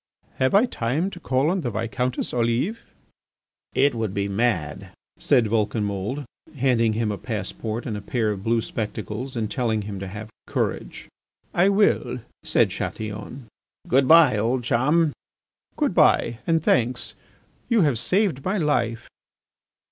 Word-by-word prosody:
"Have 130 +7 +2
I 210 +5 +6
time 155 - -1
to 175 - -9
call 135 +1 +1
on 190 0 0
the 130 - -2
Viscountess 115 +3 -2
Olive?" 120 - 0 1.0
"It 140 +1 +4
would 110 -4 -3
be 100 0 0
mad," 100 -8 -1 0.3
said 120 - +3
Vulcanmould, 105 +3 -1 0.3
handing 120 -4 +2
him 110 -1 0
a 100 - -5
passport 110 +1 -4
and 110 - -3
a 105 - -5
pair 110 0 0
of 100 -2 -5
blue 115 +1 +2
spectacles, 110 +4 -5
and 110 -3 -2
telling 110 -4 0
him 100 -1 -6
to 95 - -5
have 105 +3 -8 0.2
courage. - - -3 0.5
"I 180 +3 +4
will," 200 - +2 0.2
said - - +2
Chatillon. 110 +4 -5 0.4
"Good 130 +1 +3
bye! 160 -9 +7
old 120 +4 0
chum." 150 +6 +2 0.6
"Good - - +1
bye 120 - +3
and 165 -2 +2
thanks! 125 -2 +1 0.6
You 235 -3 +4
have 140 -8 +2
saved 180 - +1
my 195 +3 0
life." 120 - 0
120 Hz, 145 wpm, -24 LUFS, 110-140 Hz, 1.0 s, bye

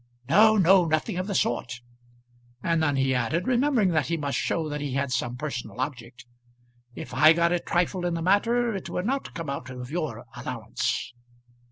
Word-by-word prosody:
"No, 215 +8 +6
no; 190 -1 +5
nothing 155 +2 -1
of 185 +1 -2
the 200 - -3
sort." 125 -3 -1 0.8
And 165 -1 +1
then 145 -3 +1
he 135 -1 +1
added, 130 +9 0
remembering 255 -5 +2
that 155 -5 +1
he 170 - -1
must 140 -3 -2
show 160 -2 -1
that 150 -1 -4
he 145 -3 -3
had 140 0 -1
some 120 -1 -2
personal 125 -6 -5
object, 125 -2 -5 0.7
"If - - -8
I 155 +5 +7
got 170 +1 +2
a 175 - +2
trifle 175 +2 -1
in 175 - -1
the 165 - -3
matter 230 +5 +2
it 195 - -5
would 180 - -3
not 270 +4 -2
come 165 -4 -4
out 140 - -6
of 125 0 -8
your 160 -3 -4
allowance." 65 - -3
160 Hz, 190 wpm, -26 LUFS, 135-185 Hz, 0.8 s, I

